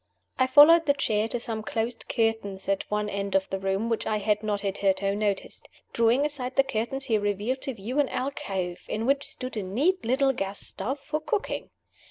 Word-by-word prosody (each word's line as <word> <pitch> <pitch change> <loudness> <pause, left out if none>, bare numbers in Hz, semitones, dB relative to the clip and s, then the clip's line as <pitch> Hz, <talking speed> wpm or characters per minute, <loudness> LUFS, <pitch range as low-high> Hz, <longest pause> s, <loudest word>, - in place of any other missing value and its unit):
I 260 - +4
followed 305 +4 +7
the 285 - +4
chair 220 -6 0
to 240 +1 -3
some 225 -2 -3
closed 225 +3 -3
curtains 220 -4 0
at 195 0 -1
one 210 0 0
end 200 -1 -3
of 190 0 +2
the 195 - -1
room, 195 +3 -1
which 230 -1 -1
I 215 - +1
had 210 0 +1
not 210 -2 -1
hitherto 195 0 0
noticed. 205 -2 -2 0.2
Drawing 235 +5 +3
aside 265 -4 -4
the 275 - +5
curtains, 270 +1 -3
he 220 -2 +2
revealed 205 +6 -1
to 270 - -4
view 230 +7 -3
an 285 - +2
alcove, 190 -9 -3
in 220 +2 -2
which 275 +2 +1
stood 255 -1 -6
a - - 0
neat 280 - 0
little 270 +3 +2
gas 195 -3 -3
stove 260 +9 -3
for 305 +3 -3
cooking. 435 +3 -2
225 Hz, 200 wpm, -27 LUFS, 200-270 Hz, 0.2 s, followed